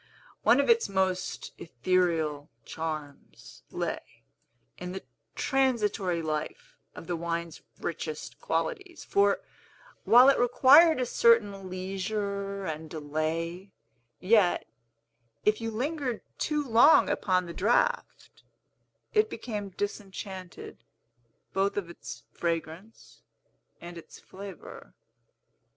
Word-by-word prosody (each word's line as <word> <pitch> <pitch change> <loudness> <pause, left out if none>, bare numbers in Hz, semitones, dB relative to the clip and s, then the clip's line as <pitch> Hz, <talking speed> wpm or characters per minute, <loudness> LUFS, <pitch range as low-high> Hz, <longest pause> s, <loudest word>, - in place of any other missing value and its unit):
One - - +5
of - - +2
its 465 -1 +4
most 190 -1 -1
ethereal 160 0 0 0.2
charms 155 -3 -7
lay - - -5 0.6
in 180 0 -6
the 190 - -7 0.3
transitory 210 - 0
life 160 - -4 0.2
of - - -9
the 175 - -2
wine's 170 0 -4 0.2
richest 460 - -5
qualities; 390 -8 -3
for, 200 0 +2 0.6
while 245 +3 +7
it 275 - +3
required 275 +6 +6
a 255 - +1
certain 205 -5 +3
leisure 195 +1 -3
and 160 -1 -5
delay, 165 +5 -3 0.5
yet, 195 -2 +3 0.8
if 210 +2 +2
you 225 - -2
lingered 255 +1 -3 0.2
too 300 -1 0
long 240 +7 +6
upon 185 -2 +1
the 170 - -7
draught, 240 - 0 0.7
it 430 0 +3
became 210 -3 -5
disenchanted 195 -1 -7 0.7
both 195 +1 0
of 175 -4 -3
its - - -10
fragrance 170 +5 -5 0.6
and 175 0 -9
its - - -14
flavor. 190 - -11
195 Hz, 100 wpm, -28 LUFS, 170-235 Hz, 0.8 s, while